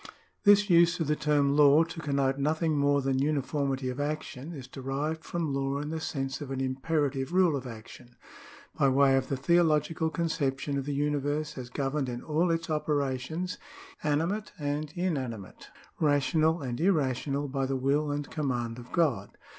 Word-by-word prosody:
This 205 0 +6
use 170 -1 +5
of 165 - 0
the 150 +1 +1
term 145 -2 +2
law 150 +1 +6
to 165 0 -7
connote 140 -3 0
nothing 155 +2 +1
more 140 -1 +2
than 135 -1 +1
uniformity 140 -2 -1
of 125 +2 -4
action 150 0 -4
is 140 -6 -8
derived 140 +4 -3
from 165 -4 -2
law 135 0 -1
in 150 +1 -4
the 160 - -3
sense 135 -3 -3
of 145 - -6
an 135 -1 -3
imperative 135 +1 -1
rule 180 -4 +4
of 130 -2 -4
action, 120 +1 -11 0.6
by 140 - +3
way 135 0 +4
of 135 -1 0
the 135 - -2
theological 160 +1 +2
conception 145 -4 -1
of 135 -1 -2
the 145 -1 -2
universe 145 +1 -1
as 125 -2 -7
governed 135 +1 -2
in 120 0 -5
all 160 +3 +1
its 165 0 -1
operations 150 +3 -2 0.4
(animate 165 +8 -1
and 145 0 -3
inanimate, 130 - -4 0.3
rational 155 +2 +2
and 125 +2 -4
irrational) 145 -5 +1
by 135 0 -1
the 135 - -1
will 140 +3 +1
and 145 0 -3
command 120 -6 -2
of 120 0 -12
God. 160 -8 0
145 Hz, 170 wpm, -29 LUFS, 135-155 Hz, 0.6 s, This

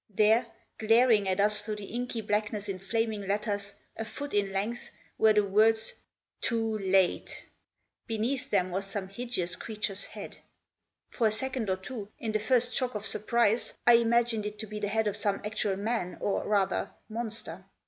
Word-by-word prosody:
There, 220 +4 +4 0.3
glaring 225 -2 +4
at 185 +1 0
us 210 +1 +3
through 210 0 -3
the 210 -1 -7
inky 245 -1 -2
blackness 210 0 -1
in 195 -2 -3
flaming 215 0 -1
letters, 205 0 -2 0.2
a 225 - -3
foot 285 +6 -7
in 200 -1 +1
length, 225 +7 -2 0.3
were 220 -1 +6
the 210 0 +4
words 220 +3 +3 0.5
"TOO 225 -2 0
LATE!" 190 -2 +1 0.6
Beneath 235 +3 -1
them 185 -2 +1
was 195 +2 -2
some 195 -1 -3
hideous 200 -5 -2
creature's 210 -3 -2
head. - - -9 0.7
For 230 - +2
a - - +1
second 250 -1 -2
or 190 - +1
two, 205 +1 -7
in 225 - -3
the 215 - +1
first 245 +3 +2
shock 255 -3 0
of 210 0 -2
surprise, 230 +1 +1
I 240 - +8
imagined 230 -2 +2
it 210 0 -7
to 220 - -4
be 210 0 -6
the 205 - -1
head 220 +2 +1
of 210 - 0
some 200 -1 0
actual 210 -2 0
man, 205 -4 -2
or, 200 - -1
rather, 200 -2 +1
monster. 220 -6 -5
215 Hz, 175 wpm, -29 LUFS, 200-230 Hz, 0.7 s, I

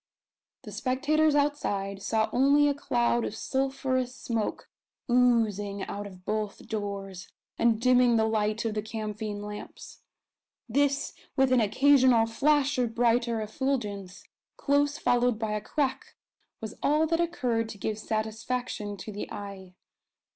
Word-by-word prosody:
The - - -9
spectators 295 +4 +1
outside 205 -10 -1
saw 220 +2 +1
only 280 +3 +4
a 285 - +2
cloud 240 -4 0
of 210 - -4
sulphurous 260 0 -1
smoke 230 -4 -3 0.4
oozing 220 -5 +2
out 205 0 -5
of 185 -2 -14
both 215 -1 -3
doors, 200 -3 -5 0.3
and 230 -2 +3
dimming 250 -1 +4
the 220 -1 +3
light 215 0 0
of 225 - -1
the 210 - -1
camphine 215 -1 -5
lamps. 210 0 -9 0.7
This, 280 +3 +1 0.2
with 265 -1 +3
an 255 -2 +5
occasional 255 +1 +4
flash 285 +4 +2
of 235 -2 -1
brighter 235 -1 +2
effulgence, 210 -5 -3 0.3
close 285 +1 +1
followed 245 -1 +2
by 220 -1 -2
a 210 0 -1
crack, 270 +4 -2 0.5
was 220 - -5
all 300 +2 +3
that 330 +1 0
occurred 250 -10 -1
to 210 - -8
give 215 +1 -3
satisfaction 220 -1 -3
to 205 +4 -7
the 205 - -6
eye. 195 -2 -8
230 Hz, 135 wpm, -28 LUFS, 210-265 Hz, 0.7 s, an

